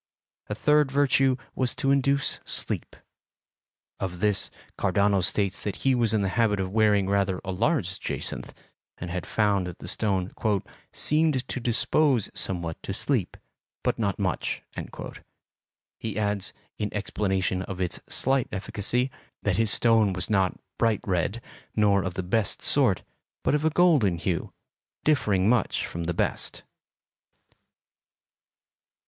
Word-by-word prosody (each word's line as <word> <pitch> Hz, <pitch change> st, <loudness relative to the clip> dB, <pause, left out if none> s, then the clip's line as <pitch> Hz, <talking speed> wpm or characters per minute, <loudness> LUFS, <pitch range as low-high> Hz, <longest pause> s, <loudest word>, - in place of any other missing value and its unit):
A 105 Hz, -, -2 dB
third 150 Hz, +5 st, +3 dB
virtue 135 Hz, -1 st, +3 dB, 0.2 s
was 130 Hz, -2 st, 0 dB
to 135 Hz, -, +1 dB
induce 140 Hz, 0 st, +2 dB
sleep. -, -, -1 dB, 1.0 s
Of 90 Hz, -2 st, -4 dB
this, 105 Hz, -1 st, +1 dB, 0.3 s
Cardano 100 Hz, 0 st, +2 dB
states 100 Hz, 0 st, +1 dB
that 100 Hz, -3 st, -3 dB
he 135 Hz, -, +5 dB
was 120 Hz, -3 st, +2 dB
in 110 Hz, -2 st, +1 dB
the 95 Hz, -, 0 dB
habit 105 Hz, -3 st, +3 dB
of 95 Hz, -1 st, -2 dB
wearing 105 Hz, -2 st, +3 dB
rather 100 Hz, -2 st, +1 dB
a 95 Hz, -, -2 dB
large 95 Hz, -, 0 dB
jacinth, -, -, -4 dB, 0.5 s
and 90 Hz, -1 st, -6 dB
had 90 Hz, -2 st, -4 dB
found 100 Hz, -4 st, +1 dB
that 90 Hz, -, -7 dB
the -, -, -9 dB
stone 95 Hz, -4 st, 0 dB, 0.6 s
"seemed 150 Hz, -4 st, +2 dB
to -, -, -3 dB
dispose 125 Hz, +1 st, +2 dB
somewhat 85 Hz, -3 st, -3 dB
to -, -, -4 dB
sleep, -, -, -1 dB, 0.5 s
but -, -, 0 dB
not 100 Hz, -4 st, 0 dB
much." 95 Hz, -3 st, -2 dB, 1.4 s
He 110 Hz, -2 st, -4 dB
adds, 105 Hz, -2 st, 0 dB, 0.3 s
in 105 Hz, -1 st, -2 dB
explanation 95 Hz, -3 st, -1 dB
of 95 Hz, -1 st, -6 dB
its 90 Hz, -2 st, -1 dB
slight 135 Hz, -1 st, +2 dB
efficacy, 110 Hz, +6 st, 0 dB, 0.3 s
that -, -, +1 dB
his 115 Hz, -1 st, +2 dB
stone 110 Hz, -3 st, +4 dB
was 90 Hz, +3 st, -1 dB
not 95 Hz, -3 st, +1 dB, 0.2 s
bright 115 Hz, -3 st, +2 dB
red, 95 Hz, +4 st, -1 dB, 0.3 s
nor 100 Hz, -2 st, +4 dB
of 90 Hz, -2 st, -4 dB
the 95 Hz, -, -2 dB
best 100 Hz, +3 st, -1 dB
sort, -, -, +3 dB, 0.4 s
but -, -, +2 dB
of 150 Hz, +1 st, +1 dB
a -, -, +5 dB
golden 150 Hz, -, +3 dB
hue, 85 Hz, +1 st, -2 dB, 0.5 s
differing 105 Hz, -11 st, +2 dB
much 120 Hz, -3 st, +2 dB
from 85 Hz, 0 st, -5 dB
the 85 Hz, -, -1 dB
best. -, -, 0 dB
105 Hz, 140 wpm, -26 LUFS, 95-125 Hz, 1.4 s, he